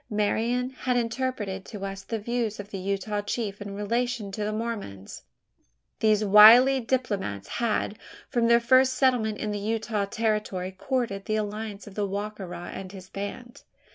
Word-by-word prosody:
Marian 230 +4 0
had 255 -1 -1
interpreted 230 -5 -2
to 200 -3 -6
us 195 0 -5
the 225 - -4
views 225 -1 -2
of 205 +1 -8
the 195 - -4
Utah 200 +2 -2
chief 205 -1 -3
in 200 -1 -6
relation 230 0 -1
to 210 +2 -3
the 210 - -1
Mormons. 215 - -5 0.8
These 215 -1 +3
wily 230 +7 +9
diplomatists 205 - -2
had, 220 -2 -1 0.3
from 240 -3 +1
their 235 0 +6
first 260 +2 +4
settlement 250 -5 +2
in 210 - -3
the 205 - -2
Utah 215 0 -1
territory, 210 -4 -1
courted 200 -1 -2
the 215 - 0
alliance 210 -1 -4
of 200 - -12
Wa 205 +1 -2
ka 210 -2 -8
ra 175 0 -7
and 190 -1 -7
his 190 -1 -11
band. 220 +5 -7
215 Hz, 165 wpm, -26 LUFS, 200-235 Hz, 0.8 s, wily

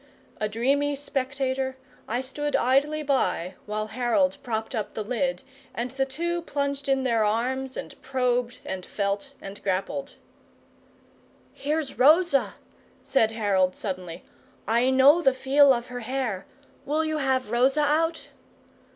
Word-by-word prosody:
A 215 - -1
dreamy 280 +6 +1
spectator, 265 -1 -2 0.3
I 240 +3 -1
stood 290 +3 -3
idly 285 +5 +2
by 260 - 0
while 215 0 -2
Harold 255 +5 +1
propped 225 -3 -3
up 215 -4 -3
the 215 - -2
lid 265 +5 -1 0.3
and 240 +1 -3
the 270 0 -1
two 340 +5 -2
plunged 280 -3 -3
in 270 -1 +2
their 230 -4 +2
arms 255 +5 -1
and - - -8
probed 250 -2 -1
and 190 -1 -4
felt 200 0 -3
and 195 +1 -9
grappled. 270 +9 -2 1.4
"Here's 300 0 -3
Rosa," 310 +2 +4 0.5
said 225 -5 +2
Harold, 195 -4 +1
suddenly. 180 -3 -5 0.4
"I 235 +4 +3
know 270 +6 +6
the 270 -5 +3
feel 275 +2 +5
of 240 -1 0
her 250 0 -5
hair. 240 -5 -3 0.4
Will 310 +3 0
you 310 0 -1
have 260 -5 0
Rosa 260 +5 +3
out?" 320 +3 0
260 Hz, 135 wpm, -26 LUFS, 225-280 Hz, 1.4 s, know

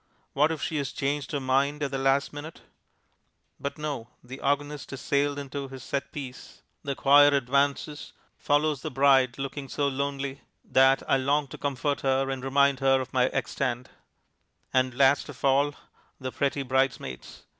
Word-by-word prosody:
What 150 +3 +3
if 160 - -4
she 155 - -2
has 140 -2 -2
changed 140 -1 -2
her 145 - -1
mind 140 +3 +1
at 140 - -2
the 135 - -2
last 135 +2 +1
minute? 150 +2 -8 1.0
But 140 - -4
no. 145 -6 -4 0.2
The 130 +2 -9
organist 145 +1 -1
has 135 - -7
sailed 145 0 +1
into 140 0 -5
his 130 -2 -10
set 140 - -3
piece; 135 -3 -9 0.2
the 140 -2 -3
choir 145 +1 +6
advances; 140 +2 0 0.2
follows 145 -1 +1
the 155 - -4
bride 135 -2 +3
looking 135 0 -5
so 145 - 0
lonely 140 0 -3 0.2
that 135 +1 +4
I - - +4
long 140 +3 +1
to - - -9
comfort 140 0 -1
her 135 0 +1
and 130 -1 -4
remind 140 0 +3
her 135 0 +3
of 130 - -6
my 125 -1 +3
egg - - -2
stand; 125 -2 -3 0.8
and, 130 -1 +1
last 140 +2 +4
of 140 -1 -6
all, 140 +2 +3 0.4
the 130 -1 -4
pretty 140 +1 -1
bridesmaids. 130 - -2
140 Hz, 170 wpm, -27 LUFS, 135-145 Hz, 1.0 s, choir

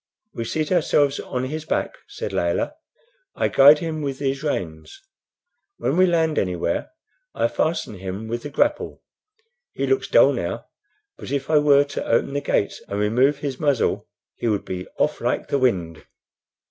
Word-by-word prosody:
"We 115 - -4
seat 155 +6 -2
ourselves 145 -5 +2
on 125 -1 -3
his 155 +4 -4
back," 155 - -1
said - - -6
Layelah. 85 - 0 0.6
"I - - +1
guide 145 +2 +7 0.2
with 140 -2 -3
these 135 -1 -2
reins. 95 - -4 0.8
When - - -1
we 185 +1 +5
land 160 -3 +2
anywhere 90 -2 -1 0.5
I - - +2
fasten 120 - -2
him 95 +4 -5
with 120 +1 -3
the 145 - -6
grapple. 295 - -1 0.7
He - - -1
looks 400 - +1
dull - - +5
now, - - -4 0.5
but - - -8
if 140 +1 -2
I 155 - +6
were 145 -1 +5
to 145 0 -5
open 115 +4 +1
the 145 - -1
gate 100 -7 -1
and 100 - -3
remove 125 +7 +3
his 140 -3 -4
muzzle 145 -5 +1 0.3
he - - -2
would 105 -3 0
be 90 0 -5
off - - 0
like - - -1
the 140 - +1
wind." 90 -11 0
135 Hz, 165 wpm, -23 LUFS, 105-150 Hz, 0.8 s, guide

